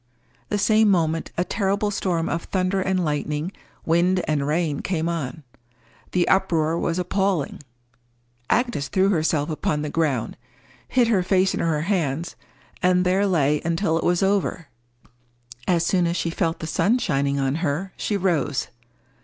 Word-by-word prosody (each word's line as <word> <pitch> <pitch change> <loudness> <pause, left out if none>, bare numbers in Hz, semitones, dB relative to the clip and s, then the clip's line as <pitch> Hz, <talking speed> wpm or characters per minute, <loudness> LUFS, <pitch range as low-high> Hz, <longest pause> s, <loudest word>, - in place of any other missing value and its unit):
The 210 - 0
same 215 +1 +4
moment 165 -4 +1
a 175 - +2
terrible 200 +2 0
storm 175 -4 -1
of 165 - -2
thunder 190 0 0
and 185 -1 0
lightning, 150 +3 -2 0.3
wind 175 +3 +2
and 145 -2 0
rain, 155 -2 0
came 165 -3 -2
on. 155 -4 -4 0.7
The 180 -1 +2
uproar 170 -4 +2
was 170 - -1
appalling. 185 -4 -1 0.9
Agnes 240 - +1
threw 190 0 +2
herself 155 -4 +1
upon 150 -1 -1
the 150 - -4
ground, 140 -8 -1 0.5
hid 245 -2 +3
her 205 -5 +3
face 190 +1 +2
in - - -2
her 160 -3 0
hands, 165 -3 -1 0.5
and 180 0 +3
there 190 +3 +2
lay 150 -5 +2
until 165 0 0
it - - -4
was 175 +1 +2
over. 190 -5 0 1.0
As 170 -2 +2
soon 180 -1 +2
as 170 +1 -1
she 170 - -1
felt 165 -1 -1
the - - -3
sun 205 +8 +2
shining 140 - 0
on 135 +2 0
her, 175 +4 -2
she 205 - -1
rose. 160 -8 0
170 Hz, 155 wpm, -23 LUFS, 155-190 Hz, 1.0 s, same